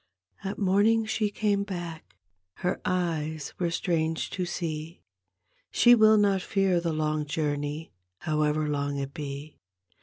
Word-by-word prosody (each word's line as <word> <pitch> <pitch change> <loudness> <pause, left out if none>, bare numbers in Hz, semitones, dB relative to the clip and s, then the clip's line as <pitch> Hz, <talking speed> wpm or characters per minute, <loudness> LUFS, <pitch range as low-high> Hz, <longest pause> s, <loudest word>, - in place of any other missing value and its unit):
At 195 0 -3
morning 210 +3 +3
she 220 -1 0
came 205 -1 0
hack.; 170 - -6 0.5
Her 180 - 0
eyes 160 -4 -1
were 175 -2 +1
strange 165 -2 -1
to 180 -2 -2
see. 165 -1 -4 0.7
She 240 - +6
will 220 -2 +6
not 200 -2 +3
fear 190 -2 +1
the 170 -1 -1
long 155 -1 0
joum^, 150 0 -2 0.3
However 150 +2 0
long 145 -1 -1
it 140 0 -4
be. 145 0 -7
165 Hz, 130 wpm, -27 LUFS, 150-195 Hz, 0.7 s, She